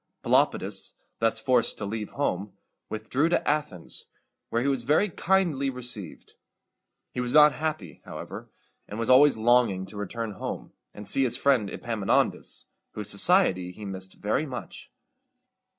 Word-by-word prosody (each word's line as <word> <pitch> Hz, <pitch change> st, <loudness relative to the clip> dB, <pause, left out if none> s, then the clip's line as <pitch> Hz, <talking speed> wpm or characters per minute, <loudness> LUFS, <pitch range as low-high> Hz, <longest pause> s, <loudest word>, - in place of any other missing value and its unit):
Pelopidas, -, -, +1 dB, 0.3 s
thus 115 Hz, 0 st, +2 dB
forced 125 Hz, +1 st, +2 dB
to 105 Hz, -, -4 dB
leave 105 Hz, +1 st, -4 dB
home, 100 Hz, -8 st, -2 dB, 0.4 s
withdrew 120 Hz, +9 st, 0 dB
to 175 Hz, -, 0 dB
Athens, 145 Hz, -, -2 dB, 0.4 s
where 115 Hz, +1 st, 0 dB
he -, -, 0 dB
was 135 Hz, -3 st, +1 dB
very 150 Hz, -, +2 dB
kindly 170 Hz, -7 st, +1 dB
received. 125 Hz, -9 st, -3 dB, 0.8 s
He -, -, -5 dB
was 125 Hz, 0 st, -2 dB
not 150 Hz, 0 st, +8 dB
happy, 155 Hz, 0 st, -4 dB
however, -, -, -8 dB, 0.4 s
and 105 Hz, -, -7 dB
was 115 Hz, +2 st, +1 dB
always 140 Hz, 0 st, +6 dB
longing 115 Hz, -5 st, +3 dB
to 100 Hz, +2 st, -11 dB
return 105 Hz, +2 st, -4 dB
home, 100 Hz, -, -6 dB, 0.2 s
and 105 Hz, -1 st, -10 dB
see 135 Hz, -, +2 dB
his 125 Hz, -3 st, +2 dB
friend 130 Hz, -8 st, +2 dB
Epaminondas, 110 Hz, -3 st, -1 dB, 0.3 s
whose 105 Hz, -2 st, 0 dB
society 100 Hz, -, +4 dB
he 105 Hz, +3 st, -10 dB
missed 95 Hz, -1 st, -6 dB
very 110 Hz, +9 st, -1 dB
much. 125 Hz, -3 st, -8 dB
115 Hz, 145 wpm, -27 LUFS, 105-140 Hz, 0.8 s, not